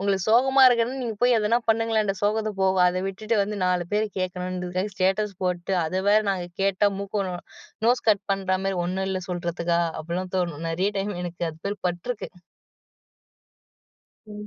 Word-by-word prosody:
உங்களுக்குச் 195 0 0
சோகமா 265 +4 +5
இருக்குனா 240 0 +3
நீங்க 225 -3 -3
போய் 245 0 +4
எதன 215 +2 +2
பண்ணுங்களேன் 225 -1 +2
அந்த 195 - 0
சோகத்த 215 +1 +1
போக. 190 0 +3
அத 185 +1 -1
விட்டுட்டு 215 +4 -2
வந்து 210 +1 -3
4 180 -1 +1
பேர் 215 +1 +2
கேக்கணும்னுங்கறதுக்காக 185 +1 -3
ஸ்டேட்டஸ் 195 +2 +1
போட்டு, 180 +1 -1
அத 185 +4 -1
வேற 210 +1 +6
நாங்க 185 -2 -2 0.2
கேட்டா 195 +1 +3
மூக்கு 200 0 -2
நோ 180 - -4 0.5
நோஸ் 245 0 +2
கட் 205 -1 +1
பண்ற 190 -1 0
மாரி 195 -1 0
''ஒண்ணும் 190 +2 -2
இல்ல'' 185 -1 -3
சொல்றதுக்கா? 170 -1 -1 0.2
அபிட்லாம் 180 +4 -4
தோணும். 170 -4 -2
நெறைய 185 +5 0
டைம் 205 +1 -2
எனக்கு 175 0 -4
அது 155 - -15
மாரி 205 0 -3
பட்ருக்கு. 190 +7 -5 2.0
ம். 210 0 -8
195 Hz, 165 wpm, -25 LUFS, 180-210 Hz, 2.0 s, வேற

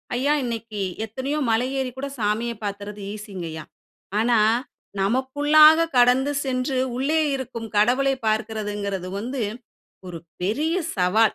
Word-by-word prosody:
ஐயா, 275 +4 +1
இன்னைக்கு 230 -3 -4 0.3
எத்தனையோ 260 +7 -3
மலை 225 +3 +2
ஏறி 260 -1 -2
கூட 280 +1 -3
சாமிய 220 +3 0
பாத்துர்ரது 205 0 -5
ஈசிங்கய்யா, 185 -7 -7 0.6
ஆனா, 235 0 +3 0.6
நமக்குள்ளாக 290 +8 +5
கடந்து 250 +3 +4
சென்று 260 0 -1 0.2
உள்ளே 295 +5 +1 0.2
இருக்கும் 235 -3 -6
கடவுளை 255 +6 +3
பார்க்கிறதுங்குறது 210 -4 -2
வந்து 245 +4 -3 0.7
ஒரு 170 - -6 0.2
பெரிய 295 - 0 0.2
சவால். 200 +4 +3
235 Hz, 110 wpm, -23 LUFS, 210-265 Hz, 0.7 s, நமக்குள்ளாக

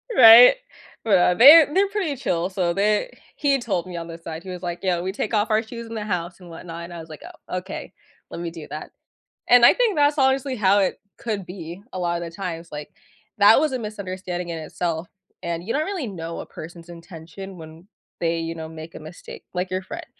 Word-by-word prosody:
Right? 230 - +10 0.5
Well, 180 -4 +4
they're 290 - +9
they're 395 +3 +3
pretty 390 -8 -2
chill, 180 -9 -1
so, 185 -3 -1
they 210 - +1 0.2
he 280 -2 +2
told 195 -8 -2
me 180 - -8
on 165 -1 -5
the 165 0 -8
side. 165 0 -8
He 190 - -9
was 180 -1 -7
like, 175 -1 -4
"Yeah. 180 -3 0
We 185 +2 -3
take 210 +3 -4
off 215 +1 +1
our 215 0 +2
shoes 230 0 -9
in 225 - -9
the 215 - -3
house 175 -3 -3
and 180 -2 -13
whatnot," 170 0 -8
and 175 - -11
I 170 - -7
was 160 0 -11
like, 155 - -11 0.3
"Oh, 180 - -3
okay. 190 +2 -8 0.4
Let 170 - -7
me 170 - -3
do 165 -3 -10
that," 150 +2 -7 0.6
and 245 -1 +8
I - - +8
think 475 -6 +1
that's 290 0 +3
honestly 265 -1 +1
how 200 -2 +3
it 195 - 0 0.2
could 210 -5 -4
be 175 0 -9
a 185 - -4
lotta 170 -1 -2
the 165 - -8
times, 170 -2 -6
like, 150 0 -7 0.5
that 205 +3 +7
was 305 0 +1
a - - 0
misunderstanding 185 -5 -5
in 165 - -4
itself, 165 +2 -4 0.4
and 170 0 -3
you 215 - -4
don't 305 +2 0
really 375 -10 -4
know 170 -4 -6
a - - -6
person's 170 +1 -11
intention 170 +2 -10
when 160 +2 -13 0.3
they, 165 0 0
you 165 0 -4
know, 160 -1 -7
make 160 +1 -10
a - - -7
mistake, 155 +3 -11
like 180 +1 -2
your 185 0 -2
friend. 330 - -8
185 Hz, 225 wpm, -23 LUFS, 170-225 Hz, 0.6 s, Right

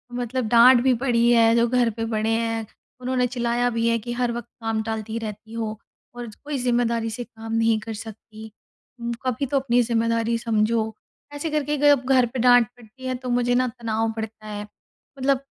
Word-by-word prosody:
मतलब 245 -1 -2
डाँट 240 +1 +7
भी 260 -1 +4
पड़ी 240 -2 +3
है। 230 -1 +5
जो 235 0 +3
घर 245 -1 +2
पे 225 +1 -5
बड़े 220 -1 -1
हैं, 225 0 -1 0.4
उन्होंने 250 0 0
चिल्लाया 240 0 0
भी 230 0 0
है 230 - +2
कि, 240 +3 -6
"हर 245 -1 0
वक़्त 240 0 -5
काम 225 -1 -1
टालती 220 0 -4
रहती 220 0 -8
हो, 220 -1 -4 0.4
और 240 -1 -6 0.2
कोई 290 -1 -3
ज़िम्मेदारी 235 -2 0
से 240 +2 -5
काम 225 -1 -9
नहीं 225 -1 +2
कर 220 +1 -7
सकती 220 0 -10 0.5
अम, 235 0 -2
कभी 255 +2 0
तो 275 +1 +1
अपनी 245 -2 +2
ज़िम्मेदारी 230 0 0
समझो।" 220 -1 0 0.4
ऐसे 290 +3 -3
करके 295 -1 0
जब 285 -2 +4
घर 255 -2 +5
पे 255 - -3
डाँट 245 -1 +6
पड़ती 245 +3 -14
है 255 0 -1
तो 250 0 -6
मुझे 245 0 +1
ना 255 0 +2
तनाव 225 -1 -1
पड़ता 220 -1 -7
है। 205 0 -5 0.6
मतलब 270 0 +2
235 Hz, 195 wpm, -23 LUFS, 225-245 Hz, 0.6 s, डाँट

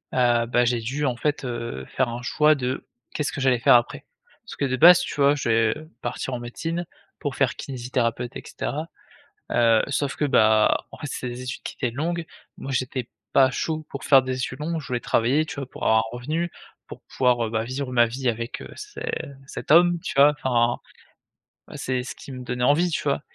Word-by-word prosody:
heu, 120 -2 +3
bah, 120 +1 +2
j'ai 120 0 +1
dû, 135 +6 -2
en 125 -3 0
fait, 145 +2 -1
heu, 115 - -5
faire 130 - -1
un 120 +1 -6
choix 150 +4 +3
de 130 -1 -3 0.3
qu'est-ce 145 -1 -1
que - - -6
j'allais 130 -2 +3
faire 120 - +6
après. 120 0 +1 0.4
Parce - - -9
que 140 - -1
de 130 -1 -1
base, 175 +5 +9
tu - - -4
vois? 140 +1 +5
Je 135 -4 -2
devais 115 +7 +1
partir 130 - -4
en 125 - -3
médecine 165 +9 -4 0.3
pour 145 -2 -3
faire 135 -3 +1
kinésithérapeute, 125 -2 -3
et - - -7
cetera. 155 +3 -4 0.6
Heu, 115 -2 +4
sauf 140 0 -1
que, 150 - 0
bah, 110 -5 +4
en - - -11
fait, 145 - -6
c'était 130 -2 -4
des 120 +1 -7
études 125 - -5
qui - - -6
étaient 125 - 0
longues. 170 +3 -2 0.3
Moi, 135 - -6
j'étais 130 -1 -2 0.3
pas 130 -1 +5
chaud 155 +3 -3
pour 140 - -6
faire 135 -2 +6
des 130 0 -2
études 130 0 -4
longues, 165 +2 -2
je - - -11
voulais 125 -2 -1
travailler, 125 +7 +2
tu - - -7
vois? 135 -2 -5
Pour - - -10
avoir 110 - +4
un 110 - -2
revenu, 160 +7 -2 0.4
pour - - -10
pouvoir, 125 -2 +1
heu, - - -4
bah, 110 -1 0
vivre 130 +2 -4
ma 120 -1 +5
vie 125 +2 -2
avec, 115 +1 -4
heu, - - -9
ce 420 0 -9 0.5
cet - - -5
homme, 175 +1 +6
tu - - -4
vois? 140 +2 +7
Enfin, 120 -2 +2 0.9
bah, - - -11
c'est 130 -1 -2
ce 130 - -7
qui - - -11
me 130 -1 -7
donnait 125 0 -3
envie, 150 +7 +3
tu - - -1
vois? 140 -1 0
130 Hz, 220 wpm, -24 LUFS, 120-145 Hz, 0.9 s, base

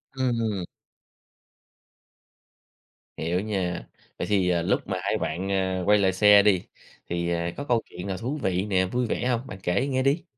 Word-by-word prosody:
Ừm. 115 -7 -1 2.5
Hiểu 85 +3 -1
nha. 95 - -2 0.3
Vậy - - -2
thì, 95 -3 +2
ờ, 85 -1 +2
lúc - - 0
mà - - -2
hai - - 0
bạn, 90 +5 -3
ờ, 95 -1 0
quay 105 +1 +5
lại 95 -2 +2
xe 105 +1 +7
đi, 100 -4 +3 0.5
thì 85 0 -1 0.3
có 145 - -3
câu 120 -5 +1
chuyện 90 +2 -7
nào 95 -1 -3
thú 130 +8 -3
vị 95 -1 0
nè, 95 -3 +2
vui 120 +7 -1
vẻ 120 - -1
hông? 125 +1 -1
Bạn 95 - -8
kể 100 +10 +1
nghe 130 -1 0
đi. 140 +6 +2
100 Hz, 175 wpm, -26 LUFS, 90-115 Hz, 2.5 s, xe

